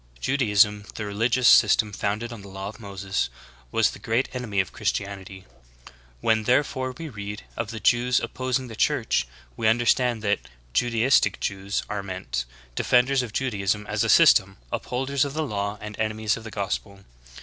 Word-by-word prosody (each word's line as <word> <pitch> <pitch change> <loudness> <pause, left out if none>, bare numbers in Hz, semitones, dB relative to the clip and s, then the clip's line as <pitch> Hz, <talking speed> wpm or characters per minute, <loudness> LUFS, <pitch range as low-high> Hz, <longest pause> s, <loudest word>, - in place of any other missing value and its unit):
Judaism, 105 - +2
the 110 - -4
religious 115 +4 +1
system 105 -1 +5
founded 105 +4 -2
on 115 - -9
the 100 - -11
law 95 0 -6
of 110 - -12
Moses, 100 - -3 0.4
w^as - - +3
the - - -11
groat 115 +4 0
enemy 120 -6 -2
of 95 - 0
Christianity. 95 -1 -4 0.8
When 110 -1 +2
therefore 130 0 +1
we 165 - -6
read 105 -5 -7
of 115 -2 -3
the 115 -1 -6
Jews 120 +4 +3
op - - -6
posing 130 0 -1
the 115 - -9
Church, 65 - +1 0.3
we 110 - 0
understand 120 0 +2
that 105 -1 +1 0.3
Judaistic 120 - +3
Jews 100 +1 -2
are 105 -1 -3
meant 95 -11 -4 0.2
— - - -27
defenders 130 +2 +3
of 120 -3 -5
Judaism 105 -4 -1
as - - -1
a - - 0
system, - - +6
upholders 135 +2 -1
of 140 0 -4
the 155 0 0
law 100 -4 -3
and 105 0 -7
enemies 110 -1 0
of 115 - -9
the - - -6
gospel. 100 -1 -4
110 Hz, 170 wpm, -25 LUFS, 100-125 Hz, 0.8 s, system